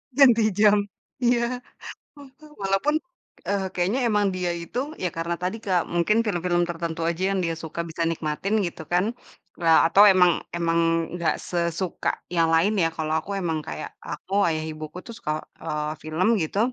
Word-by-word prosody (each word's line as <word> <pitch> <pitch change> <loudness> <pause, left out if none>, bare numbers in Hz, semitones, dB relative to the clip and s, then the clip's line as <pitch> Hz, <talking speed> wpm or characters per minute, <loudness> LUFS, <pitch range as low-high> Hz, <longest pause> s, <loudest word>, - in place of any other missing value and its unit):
Ganti 245 -5 +6
jam 210 0 +5 0.5
iya. 240 +1 +2 1.0
Walaupun, 195 +10 +1 0.5
eee, 200 -1 0
kayaknya 190 +9 0
emang 210 -1 +2
dia 180 -1 -1
itu, 245 - -4 0.2
ya 180 - +1
karena 170 +1 -1
tadi 185 +5 -1
Kak, 180 -3 +1
mungkin 175 +6 +2
film-film 175 -3 +1
tertentu 165 -1 -4
aja 170 +2 -3
yang 195 - 0
dia 165 - -1
suka 165 +1 -5
bisa 165 +1 -2
nikmatin 165 +6 -2
gitu 160 - -8
kan, 180 +3 +3 0.6
eee, 165 -1 +6
atau 200 +4 +6
emang 180 -1 +6 0.3
emang 170 0 +1 0.4
nggak 170 -2 0
sesuka 170 +1 -1 0.3
yang 165 -1 +3
lain 175 +7 +4
ya, 165 - +3
kalau 155 0 -1
aku 200 - -8
emang 160 -3 -1
kayak - - -5
aku, 190 - -7 0.2
ayah 155 -1 -1
ibuku 155 +2 -8
tuh 230 - -7
suka, 150 - -3 0.3
eee, 150 0 -2
film 160 +5 0
gitu. 160 +6 -2
175 Hz, 160 wpm, -24 LUFS, 165-200 Hz, 1.0 s, Ganti